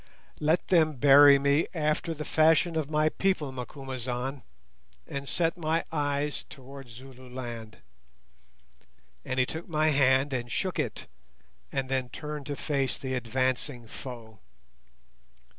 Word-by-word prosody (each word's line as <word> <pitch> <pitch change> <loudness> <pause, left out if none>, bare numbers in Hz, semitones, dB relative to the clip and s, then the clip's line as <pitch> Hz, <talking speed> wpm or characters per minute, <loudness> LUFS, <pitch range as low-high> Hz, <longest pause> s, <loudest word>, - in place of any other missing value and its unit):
"Let 155 +3 +1
them 160 -4 +4
bury 140 +1 +8
me 140 +3 +2
after 155 +1 0
the 150 0 -5
fashion 160 +1 +3
of 155 -3 -1
my 155 0 +2
people, 170 -6 0
Macumazahn, 130 0 -5 0.6
and 140 0 -5
set 165 0 0
my 160 +1 0
eyes 145 -1 -1
towards 135 -2 -11
Zululand;" 125 -3 -9 1.5
and 130 - -2
he 130 - +4
took 160 +5 -7
my 155 -1 +2
hand 135 -1 +3
and 120 -2 -3
shook - - -1
it, - - -3 0.7
and 135 -1 -1
then 130 -1 -1
turned 150 +3 -6
to 145 - -3
face 140 -2 -1
the 130 -1 -4
advancing 130 +1 -1
foe. 115 -2 -9
140 Hz, 125 wpm, -28 LUFS, 130-155 Hz, 1.5 s, bury